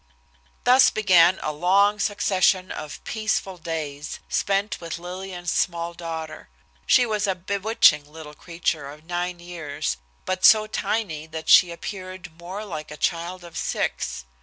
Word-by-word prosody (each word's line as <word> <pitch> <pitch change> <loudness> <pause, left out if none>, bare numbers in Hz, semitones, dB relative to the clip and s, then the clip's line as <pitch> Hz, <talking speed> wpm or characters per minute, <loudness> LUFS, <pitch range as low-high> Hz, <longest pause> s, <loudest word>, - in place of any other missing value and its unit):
Thus 255 +2 +6
began 185 -4 +5
a 155 - -1
long 195 +6 +3
succession 190 -3 +1
of 150 -1 -7
peaceful 215 -4 -2
days, 155 -3 -5
spent 200 +1 -1
with 165 -1 -5
Lillian's 180 0 -5
small 170 -1 -1
daughter. 165 - -7 0.4
She 245 - +5
was 210 -2 -1
a 190 - +1
bewitching 185 -6 +2
little 155 -1 -10
creature 165 -3 -3
of 150 +2 -12
nine 175 +1 -3
years, 165 - -4 0.3
but 185 0 -2
so 215 -1 +7
tiny 200 -7 -2
that 160 0 -7
she 180 - +8
appeared 185 -1 -8
more 190 +5 -6
like 155 -6 -6
a 150 - -9
child 175 +3 -2
of 170 -1 -12
six. - - -2
175 Hz, 140 wpm, -24 LUFS, 160-195 Hz, 0.4 s, she